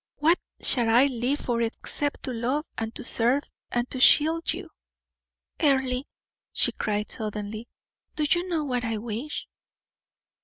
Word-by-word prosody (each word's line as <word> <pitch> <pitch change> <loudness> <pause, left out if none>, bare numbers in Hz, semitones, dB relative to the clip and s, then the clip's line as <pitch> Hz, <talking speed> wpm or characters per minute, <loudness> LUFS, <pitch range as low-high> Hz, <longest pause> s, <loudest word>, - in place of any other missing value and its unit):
What 325 +4 +3 0.2
shall 240 -3 +3
I 235 +3 +6
live 260 +2 -1
for 235 -1 -1
except 275 +5 -1
to 255 - -3
love 255 +6 -1
and 225 0 -3
to - - -3
serve 245 +4 +2 0.3
and 240 0 0
to 260 - -2
shield 320 +5 +5
you?" - - -6 0.9
"Earle," 265 -3 +2 0.5
she - - +2
cried 210 0 -2
suddenly, 215 +1 -4 0.5
"do 305 - 0
you 350 +4 +1
know 325 -3 0
what 250 -4 -2
I 225 -2 -1
wish?" 235 +7 -5
250 Hz, 145 wpm, -26 LUFS, 230-290 Hz, 0.9 s, I